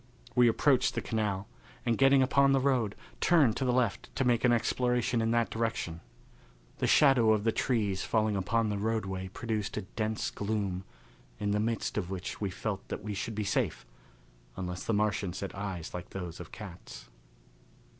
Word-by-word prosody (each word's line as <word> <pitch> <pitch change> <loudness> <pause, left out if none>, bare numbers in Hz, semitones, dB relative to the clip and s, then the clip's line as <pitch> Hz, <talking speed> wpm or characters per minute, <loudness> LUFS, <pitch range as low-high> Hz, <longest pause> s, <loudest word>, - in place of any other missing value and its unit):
We 125 -1 +5
approached 125 +3 +3
the - - 0
canal, 105 -4 -2 0.4
and, 120 - +2
getting 135 +2 +5
upon 140 +1 +4
the 135 - +4
road, 130 -6 +1 0.2
turned 145 -10 +4
to 130 - -1
the 125 - +2
left 120 -4 0
to 135 - +1
make 120 -2 +2
an 125 - +5
exploration 120 0 +1
in 115 - +1
that 115 0 +1
direction. 110 -7 -2 0.8
The - - +1
shadow 125 -6 +5
of 105 -1 0
the 115 - +3
trees 105 -6 0
falling 110 -2 +1
upon 110 +3 +1
the 105 -1 -2
roadway 100 -4 -2
produced 105 +1 -3
a - - -2
dense 110 +2 -2
gloom, 100 -3 -2 0.5
in 105 -1 0
the 105 - +1
midst 115 0 -1
of 90 -3 -4
which 95 +1 -5
we 100 - 0
felt 100 +1 -4
that - - -5
we 105 0 -3
should 105 +3 -4
be 105 - -1
safe, 100 -9 -1 0.7
unless 90 -1 -4
the 115 - 0
Martians 100 -3 0
had 100 - -4
eyes 95 -4 -5
like 90 +1 -6
those 90 -3 -6
of 90 - -9
cats. 100 -6 -10
110 Hz, 180 wpm, -30 LUFS, 95-120 Hz, 0.8 s, We